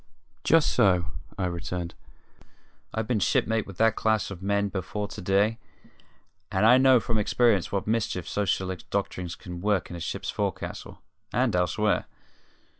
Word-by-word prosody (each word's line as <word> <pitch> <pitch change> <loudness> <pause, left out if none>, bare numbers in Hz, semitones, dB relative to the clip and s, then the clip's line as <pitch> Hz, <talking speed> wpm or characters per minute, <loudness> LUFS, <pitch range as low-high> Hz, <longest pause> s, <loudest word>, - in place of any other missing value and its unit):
"Just 165 -2 +4
so," 90 -3 +4 0.3
I 95 - -1
returned. 85 -1 -4 1.0
"I've 110 0 -2
been 115 -2 0
shipmate 110 +3 +1
with 95 -2 -10
that 110 0 +3
class 110 -3 +1
of 95 -2 -8
man 100 +1 +1
before 100 +2 -3
to - - -8
day, 100 +5 +2 0.9
and 95 +1 +2
I 125 +3 +7
know 130 -1 +6
from 110 +1 -1
experience 105 -2 +2
what 100 -1 -1
mischief 105 -5 -1
socialistic 95 -2 -2
doctrines 90 -3 -2
can 90 -2 -8
work 100 -3 0
in - - -5
a - - -6
ship's 85 - -4
forecastle - - -4 0.3
and - - +1
elsewhere. 90 +4 +1
100 Hz, 150 wpm, -27 LUFS, 90-110 Hz, 1.0 s, I